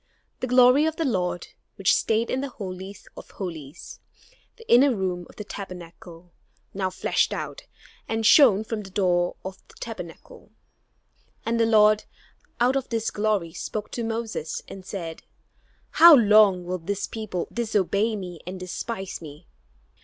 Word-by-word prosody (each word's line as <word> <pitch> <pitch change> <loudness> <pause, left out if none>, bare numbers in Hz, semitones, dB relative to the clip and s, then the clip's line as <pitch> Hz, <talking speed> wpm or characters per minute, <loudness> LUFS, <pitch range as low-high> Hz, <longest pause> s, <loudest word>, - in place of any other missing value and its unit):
The 255 - -2
glory 250 +4 +6
of 320 - -2
the 325 - -1
Lord, 180 -8 -1 0.3
which 195 - +3
stayed 225 +1 0
in 260 - 0
the 280 - -4
Holy 190 -3 -7 0.2
of - - -11
Holies, 165 -5 -8 0.6
the 455 - -16
inner 255 +1 +5
room 180 -3 -3
of - - -16
the 210 - -7
Tabernacle, 175 -3 -10 0.4
now 190 -1 -1
flashed 185 0 0
out, - - -6 0.4
and 225 0 -1
shone 220 -5 +6
from 220 -1 -4
the 195 - -10
door 180 -2 +1
of 190 0 -7
the - - -19
Tabernacle. - - -10 0.9
And 230 0 0
the 230 - +3
Lord, 215 -1 +5 0.5
out 250 +2 +3
of 270 - -2
this 225 -1 -1
glory, 205 -6 -1
spoke 210 +3 -5
to 235 - -3
Moses, 225 -7 -4
and 195 - -10
said, 170 -4 -6 0.7
"How 335 -1 +9
long 210 -6 +5
will 180 +1 -3
this 200 +4 -3
people 215 -6 -5
disobey 215 -1 0
me 180 -4 -7
and 185 +1 -6
despise 190 +2 -5
me? 155 +1 -11
205 Hz, 155 wpm, -25 LUFS, 180-230 Hz, 0.9 s, How